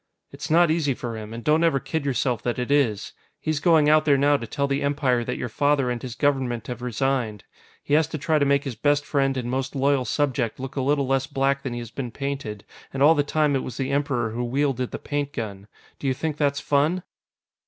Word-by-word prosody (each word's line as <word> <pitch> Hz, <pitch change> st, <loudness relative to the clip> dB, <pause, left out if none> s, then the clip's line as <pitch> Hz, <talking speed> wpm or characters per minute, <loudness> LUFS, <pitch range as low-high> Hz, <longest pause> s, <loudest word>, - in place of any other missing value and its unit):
"It's -, -, -7 dB
not 170 Hz, +1 st, +5 dB
easy 150 Hz, -5 st, +1 dB
for 120 Hz, -2 st, -5 dB
him, 110 Hz, -1 st, -7 dB
and 115 Hz, +1 st, -7 dB
don't 155 Hz, +2 st, +3 dB
ever 165 Hz, -5 st, +3 dB
kid 160 Hz, +2 st, -3 dB
yourself 125 Hz, -3 st, 0 dB
that 120 Hz, -, -2 dB
it 125 Hz, +2 st, -2 dB
is. 130 Hz, -8 st, +1 dB, 0.3 s
He's 155 Hz, -2 st, -1 dB
going 160 Hz, -3 st, +4 dB
out 155 Hz, 0 st, +5 dB
there 145 Hz, -2 st, +4 dB
now 145 Hz, +1 st, +4 dB
to 115 Hz, -5 st, -3 dB
tell 140 Hz, +5 st, -1 dB
the 140 Hz, +1 st, -1 dB
Empire 140 Hz, -4 st, +1 dB
that -, -, -3 dB
your -, -, -3 dB
father 140 Hz, +2 st, +1 dB
and 120 Hz, -1 st, -3 dB
his 125 Hz, -3 st, -6 dB
Government 130 Hz, -5 st, 0 dB
have 120 Hz, -1 st, -6 dB
resigned. 125 Hz, -3 st, -1 dB, 0.4 s
He 145 Hz, -, -2 dB
has 155 Hz, 0 st, +4 dB
to 160 Hz, -, -5 dB
try 155 Hz, +2 st, +1 dB
to -, -, +3 dB
make 140 Hz, 0 st, +2 dB
his 135 Hz, -, -4 dB
best 145 Hz, +5 st, +1 dB
friend 135 Hz, -2 st, +1 dB
and 125 Hz, -2 st, -3 dB
most 135 Hz, +2 st, -2 dB
loyal 135 Hz, -1 st, +2 dB
subject 130 Hz, -6 st, -1 dB
look 135 Hz, 0 st, -6 dB
a 135 Hz, -, 0 dB
little 140 Hz, +1 st, +1 dB
less 135 Hz, 0 st, 0 dB
black 135 Hz, 0 st, 0 dB
than 135 Hz, -3 st, -4 dB
he 120 Hz, -, -4 dB
has 115 Hz, -1 st, -9 dB
been 125 Hz, -1 st, -4 dB
painted, 135 Hz, -6 st, -5 dB, 0.3 s
and 135 Hz, 0 st, 0 dB
all 155 Hz, +3 st, +7 dB
the 145 Hz, -, +2 dB
time 150 Hz, 0 st, +1 dB
it 135 Hz, -, +1 dB
was 125 Hz, -, -7 dB
the 135 Hz, 0 st, -2 dB
Emperor 135 Hz, -5 st, 0 dB
who 120 Hz, +2 st, -3 dB
wielded 130 Hz, 0 st, 0 dB
the -, -, -5 dB
paint 145 Hz, -1 st, -3 dB
gun. 100 Hz, -3 st, -6 dB, 0.3 s
Do 140 Hz, -, -3 dB
you 130 Hz, -, +1 dB
think 155 Hz, +2 st, -2 dB
that's 140 Hz, -1 st, +1 dB
fun?" 150 Hz, +6 st, +1 dB
135 Hz, 240 wpm, -24 LUFS, 125-145 Hz, 0.4 s, all